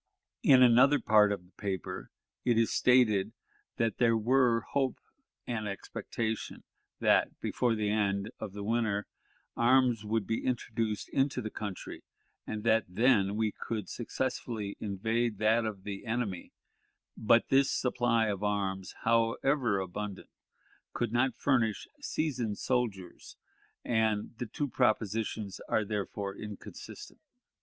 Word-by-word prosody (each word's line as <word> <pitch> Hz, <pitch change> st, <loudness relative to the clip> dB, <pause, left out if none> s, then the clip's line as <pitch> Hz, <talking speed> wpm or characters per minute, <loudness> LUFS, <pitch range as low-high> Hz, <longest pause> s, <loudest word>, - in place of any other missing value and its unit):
In 130 Hz, -2 st, +7 dB
another 130 Hz, +4 st, +6 dB
part 105 Hz, -2 st, +5 dB
of 100 Hz, -3 st, -3 dB
the 90 Hz, -, -24 dB
paper 95 Hz, -5 st, -4 dB, 0.3 s
it 120 Hz, -2 st, +2 dB
is 115 Hz, -1 st, +2 dB
stated 110 Hz, -5 st, +3 dB, 0.4 s
that 115 Hz, -2 st, 0 dB
there 115 Hz, -2 st, +4 dB
were 120 Hz, 0 st, +3 dB
hope 135 Hz, +2 st, -1 dB, 0.5 s
and 110 Hz, -3 st, -3 dB
expectation 110 Hz, +3 st, -4 dB, 0.4 s
that, -, -, +2 dB
before 120 Hz, -2 st, 0 dB
the 105 Hz, -1 st, 0 dB
end 100 Hz, 0 st, 0 dB
of 105 Hz, -3 st, -6 dB
the 100 Hz, 0 st, -6 dB
winter, 110 Hz, -2 st, 0 dB, 0.5 s
arms 120 Hz, -2 st, +3 dB
would 110 Hz, 0 st, -1 dB
be 115 Hz, -, -2 dB
introduced 115 Hz, -4 st, -2 dB
into 135 Hz, -1 st, +1 dB
the 110 Hz, -3 st, -4 dB
country, 100 Hz, -4 st, -6 dB, 0.4 s
and 105 Hz, -1 st, -4 dB
that 115 Hz, 0 st, +3 dB
then 100 Hz, 0 st, +3 dB
we 110 Hz, -1 st, +1 dB
could 105 Hz, -3 st, -5 dB
successfully 115 Hz, -4 st, -3 dB
invade 110 Hz, +2 st, -1 dB
that 110 Hz, +2 st, +3 dB
of 100 Hz, -4 st, -5 dB
the 100 Hz, -1 st, -6 dB
enemy; 110 Hz, -5 st, -3 dB, 0.6 s
but 115 Hz, +2 st, +3 dB
this 135 Hz, 0 st, +4 dB
supply 120 Hz, -3 st, +1 dB
of 100 Hz, -3 st, -2 dB
arms, 100 Hz, -2 st, -2 dB
however 115 Hz, +1 st, +2 dB
abundant, 95 Hz, +2 st, -6 dB, 0.6 s
could 120 Hz, -3 st, -1 dB
not 120 Hz, +2 st, +1 dB
furnish 120 Hz, -6 st, +1 dB
"seasoned 130 Hz, -, -2 dB
soldiers," 110 Hz, -8 st, -3 dB, 0.5 s
and 110 Hz, -1 st, 0 dB
the 120 Hz, -, -3 dB
two 145 Hz, +6 st, -3 dB
propositions 110 Hz, -4 st, -1 dB
are 110 Hz, -, +1 dB
therefore 100 Hz, -1 st, -3 dB
inconsistent. 105 Hz, -1 st, -9 dB
110 Hz, 130 wpm, -30 LUFS, 105-120 Hz, 0.6 s, In